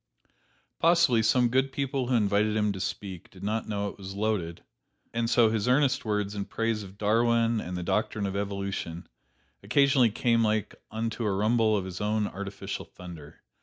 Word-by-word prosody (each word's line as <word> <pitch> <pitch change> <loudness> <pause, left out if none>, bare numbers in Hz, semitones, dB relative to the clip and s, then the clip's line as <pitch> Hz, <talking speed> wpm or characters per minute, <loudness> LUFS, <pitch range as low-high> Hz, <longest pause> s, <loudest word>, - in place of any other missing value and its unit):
Possibly, 165 -9 +4
some 120 +2 +3
good 130 +2 +1
people 135 -1 -2
who 125 - +1
invited 105 -1 +2
him 105 -1 +2
to 95 - -5
speak 95 -2 -5
did 95 0 -14
not 110 +2 -2
know 100 -1 -1
it 100 - -8
was 95 0 -7
loaded; 100 -6 -2 0.5
and 115 0 0
so 120 -2 +4
his 110 0 -1
earnest 130 0 +2
words 105 -1 -1
in 100 -1 -3
praise 115 -1 -1
of 95 -1 -11
Darwin 115 +2 +2
and 90 0 -5
the 90 - -4
doctrine 105 +2 -1
of 100 0 -3
evolution, 100 -4 -4 0.5
occasionally 140 -4 +4
came 115 +1 +2
like 110 -2 0 0.2
unto 115 +1 -3
a 105 - +1
rumble 110 +2 +2
of 95 - -3
his 95 0 -6
own 105 0 +1
artificial 100 0 -5
thunder. 85 -5 -12
110 Hz, 175 wpm, -28 LUFS, 100-115 Hz, 0.5 s, Possibly